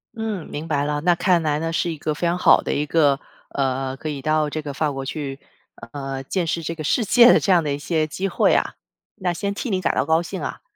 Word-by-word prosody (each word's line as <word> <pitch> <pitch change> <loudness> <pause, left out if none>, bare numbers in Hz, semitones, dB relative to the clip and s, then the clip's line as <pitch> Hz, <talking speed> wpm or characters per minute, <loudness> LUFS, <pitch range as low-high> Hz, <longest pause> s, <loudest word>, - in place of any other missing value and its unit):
嗯， 220 -6 -4
明 150 +2 -6
白 145 -3 0
了， 150 0 -1
那 175 +2 +4
看 175 0 +2
来 150 -1 0
呢， 165 +1 -2
是 170 +1 0
一 160 - -6
个 155 +1 -2
非 150 - -3
常 170 +1 0
好 - - +5
的 - - -2
一 150 - 0
个， 145 -3 +3 0.3
呃， 135 -1 -1
可 155 - -5
以 140 -2 -5
到 155 0 +1
这 155 +1 -4
个 145 -2 -6
法 150 +1 0
国 135 -1 -5
去， 140 -1 -5 0.5
呃， 135 -1 -5
见 175 +5 -2
识 165 +1 -2
这 165 - -3
个 160 -2 -7
世 225 - +1
界 240 +4 +7
的 - - +5
这 195 - 0
样 175 -3 +4
的 145 -2 -1
一 - - -2
些 155 +1 -1
机 185 +6 -3
会 190 - +2
啊， - - 0 0.4
那 180 -4 -1
先 200 +3 -3
替 240 - -4
你 190 -3 0
感 - - +1
到 - - +1
高 160 +2 +3
兴 185 +2 -6
啊。 - - -5
155 Hz, 285 characters per minute, -22 LUFS, 145-175 Hz, 0.5 s, 界